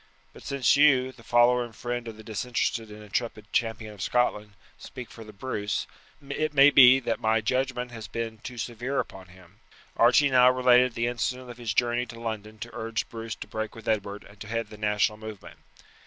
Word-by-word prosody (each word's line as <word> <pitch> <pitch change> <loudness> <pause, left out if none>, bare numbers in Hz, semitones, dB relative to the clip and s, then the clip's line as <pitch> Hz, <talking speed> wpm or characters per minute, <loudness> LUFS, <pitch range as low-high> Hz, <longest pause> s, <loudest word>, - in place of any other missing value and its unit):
But - - -14
since 140 -2 +2
you, 135 -3 +4
the 125 - -18
follower 120 +1 +4
and 115 -2 -10
friend 120 0 -4
of 110 -1 -8
the 110 - -12
disinterested 115 0 -2
and 105 0 -11
intrepid 105 0 -4
champion 110 -2 -1
of 100 - -11
Scotland, 105 -3 0 0.3
speak 125 -3 -9
for 115 - -10
the 110 - -12
Bruce, 105 -1 -3 0.4
it 150 +2 -2
maybe 135 -2 +8
that - - -2
my 110 -1 +2
judgement 125 +2 -1
has 110 -3 -8
been 115 0 -5
too 120 +2 -9
severe 120 +4 -3
upon 95 -1 -6
him." 90 +2 -19 0.4
Archie 130 +4 +5
now 125 -1 +7
related 125 -1 +4
the 115 - 0
incident 125 +1 -3
of 120 - -12
his 110 -3 -3
journey 120 0 +1
to 115 -1 -10
London 110 -2 -5
to 115 +1 -9
urge 115 -3 -3
Bruce 115 -2 -6
to - - -9
break 110 +1 -5
with 115 - -12
Edward 105 -2 -1
and 100 0 -18
to 110 - -8
head 115 -1 -3
the - - -9
national 105 0 +1
movement. 110 -2 -10
115 Hz, 200 wpm, -27 LUFS, 110-125 Hz, 0.4 s, maybe